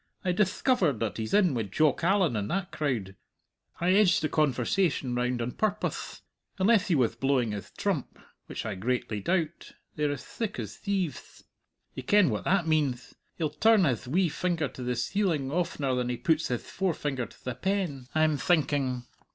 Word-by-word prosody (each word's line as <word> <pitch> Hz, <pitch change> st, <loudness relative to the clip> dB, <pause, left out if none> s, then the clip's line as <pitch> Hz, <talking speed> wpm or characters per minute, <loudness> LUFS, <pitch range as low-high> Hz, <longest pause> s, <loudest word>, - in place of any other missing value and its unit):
I 180 Hz, -, +2 dB
dithcovered 190 Hz, -, +2 dB
that 110 Hz, -1 st, -2 dB
he's 110 Hz, -1 st, -4 dB
in 195 Hz, -7 st, +4 dB
wi' 120 Hz, -, 0 dB
Jock 155 Hz, -, +2 dB
Allan 185 Hz, -, +3 dB
and 105 Hz, -1 st, -2 dB
that 180 Hz, 0 st, -2 dB
crowd 115 Hz, -11 st, -2 dB, 0.6 s
I 175 Hz, +2 st, +2 dB
edged 195 Hz, -2 st, +4 dB
the 155 Hz, -, +1 dB
conversation 140 Hz, 0 st, +1 dB
round 125 Hz, 0 st, 0 dB
on 120 Hz, -, -3 dB
purpoth! 210 Hz, +5 st, -2 dB, 0.4 s
Unless 205 Hz, +1 st, +3 dB
he 175 Hz, -, +2 dB
wath 125 Hz, -5 st, +1 dB
blowing 135 Hz, -4 st, +1 dB
his 100 Hz, -3 st, -6 dB
trump -, -, -2 dB, 0.3 s
which -, -, -5 dB
I 110 Hz, -, -2 dB
greatly 110 Hz, +2 st, -2 dB
doubt 170 Hz, -, -2 dB, 0.2 s
they're 150 Hz, -1 st, 0 dB
as 135 Hz, -2 st, -5 dB
thick 225 Hz, -3 st, -4 dB
as 110 Hz, -3 st, -5 dB
thieveth. 185 Hz, -, -3 dB, 0.5 s
Ye -, -, -6 dB
ken 185 Hz, -, +4 dB
what 105 Hz, -, -3 dB
that 190 Hz, -2 st, +2 dB
meanth. 145 Hz, -7 st, 0 dB, 0.2 s
He'll 155 Hz, -3 st, -1 dB
turn 210 Hz, +5 st, +4 dB
hith 125 Hz, -4 st, -1 dB
wee 175 Hz, +7 st, +2 dB
finger 170 Hz, -1 st, -1 dB
to -, -, -10 dB
the 125 Hz, 0 st, -1 dB
ceiling 165 Hz, -, 0 dB
oftener 150 Hz, -5 st, -1 dB
than 125 Hz, -1 st, -1 dB
he 125 Hz, -, -2 dB
puts 160 Hz, +3 st, +1 dB
hith 120 Hz, -2 st, -3 dB
forefinger 145 Hz, -9 st, -2 dB
to -, -, -20 dB
the 125 Hz, -, -2 dB
pen, 165 Hz, -4 st, -2 dB
I'm 155 Hz, -1 st, +3 dB
thinking. 140 Hz, -6 st, +1 dB
150 Hz, 175 wpm, -28 LUFS, 125-180 Hz, 0.6 s, in